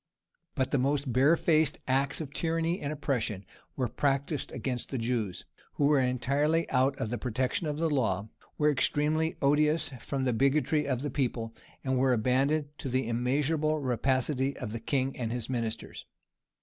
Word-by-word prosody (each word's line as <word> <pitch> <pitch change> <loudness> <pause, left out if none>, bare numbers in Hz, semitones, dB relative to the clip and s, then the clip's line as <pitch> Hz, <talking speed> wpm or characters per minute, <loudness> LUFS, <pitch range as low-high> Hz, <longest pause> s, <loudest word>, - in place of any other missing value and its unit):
But 130 -3 0
the 140 - +2
most 140 0 0
barefaced 155 +3 +3
acts 135 +3 +1
of 145 -2 -7
tyranny 165 +1 0
and 145 - -2
oppression 115 -9 -2 0.3
were 130 -2 0
practised 140 +4 -1
against 125 -3 -3
the 135 - -3
Jews, 115 -5 -2 0.3
who 145 - +1
were 145 -1 +4
entirely 140 +6 +1
out 135 +1 +2
of 110 - -3
the 120 - -2
protection 130 - -1
of 150 -1 -2
law, 115 - +1 0.3
were 150 0 +4
extremely 150 +3 +1
odious 150 +3 +3
from 135 +3 -3
the 125 -2 +1
bigotry 140 +4 +2
of 130 -1 -1
the 145 - -2
people, 115 -4 -2 0.3
and 130 -1 0
were 130 0 +4
abandoned 135 +6 +1
to 135 - -4
the 130 -1 0
immeasurable 145 +6 +1
rapacity 130 +1 0
of 110 -5 -5
the 115 - -4
king 135 +3 -1
and 115 -3 -3
his 120 +1 -4
ministers. 115 -3 -4
135 Hz, 160 wpm, -29 LUFS, 125-150 Hz, 0.3 s, were